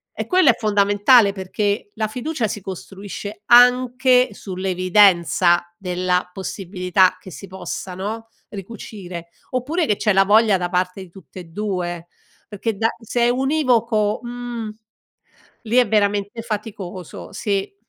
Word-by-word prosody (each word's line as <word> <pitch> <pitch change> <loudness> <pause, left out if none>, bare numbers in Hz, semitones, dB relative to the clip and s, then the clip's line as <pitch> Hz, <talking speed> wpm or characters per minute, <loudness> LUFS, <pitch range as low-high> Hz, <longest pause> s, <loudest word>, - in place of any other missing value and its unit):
e - - -3
quello 365 -6 +4
è - - -5
fondamentale 205 +1 +4
perché 205 +2 -2
la 215 0 -1
fiducia 250 +2 -3
si 210 - -5
costruisce 200 +2 -8
anche 250 +1 +5
sull'evidenza 185 -2 +2
della 180 -1 -1
possibilità 185 -1 0
che 185 - -12
si 195 - -9
possa 190 0 -6
no, 220 +4 -5 0.2
ricucire 195 -4 -8 0.2
oppure 295 +7 -1
che 210 -3 +1
c'è 215 - +1
la 195 0 +5
voglia 210 0 +4
da 175 -1 -3
parte 180 +1 -1
di 185 - -14
tutte 185 0 -13
e - - -8
2 175 -2 -4 0.5
perché 210 +1 -3
da 225 - +2
se 235 +2 -2
è 235 - +4
univoco, 245 -6 +1
mhmm, 240 -2 -6 0.9
lì 230 +1 -2
è 245 -3 +4
veramente 205 +1 0
faticoso, 200 -5 -7
sì. 195 -2 -2
205 Hz, 135 wpm, -21 LUFS, 185-230 Hz, 0.9 s, anche